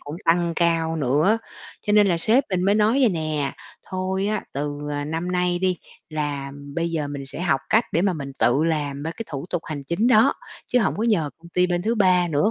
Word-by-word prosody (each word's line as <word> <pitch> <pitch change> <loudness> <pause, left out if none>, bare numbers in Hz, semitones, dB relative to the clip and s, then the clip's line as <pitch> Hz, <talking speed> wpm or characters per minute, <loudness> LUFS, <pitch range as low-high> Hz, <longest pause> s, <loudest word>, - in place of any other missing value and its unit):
cũng 145 +3 -7
tăng 170 0 +2
cao 165 -1 +1
nữa. 155 - +2 0.5
Cho 210 - +2
nên 210 -1 +6
là 175 -3 +2
sếp 225 +10 +3
mình 185 -1 0
mới 200 +2 +3
nói 215 +1 +3
vầy 255 - +5
nè: 155 -6 -2 0.4
"Thôi 190 +1 -1
á, 215 0 -1
từ, 145 +1 -3
ờ, 145 0 -2
năm 165 +4 -3
nay 180 -1 +1
đi, 185 0 +1 0.3
là 145 -3 -3 0.2
bây 170 0 -1
giờ 155 -3 -2
mình 140 -1 -6
sẽ 135 - -6
học 145 -7 +1
cách 225 +2 +4
để 165 - +2
mà 195 -1 +2
mình 140 -4 -6
tự 135 +6 +3
làm 145 -4 -1
ba 160 - -3
cái 225 +6 -6
thủ 140 +2 -5
tục 175 -2 -1
hành 145 -3 -6
chính 170 - 0
đó, 250 +2 +5 0.3
chứ 250 - +2
hổng 215 - +1
có 210 - -2
nhờ 205 -11 +1
công 170 +1 -15
ty 180 +1 +2
bên 175 -1 -1
thứ 225 +4 +1
3 185 -4 +3
nữa 155 +6 +2
170 Hz, 235 wpm, -23 LUFS, 150-190 Hz, 0.5 s, nên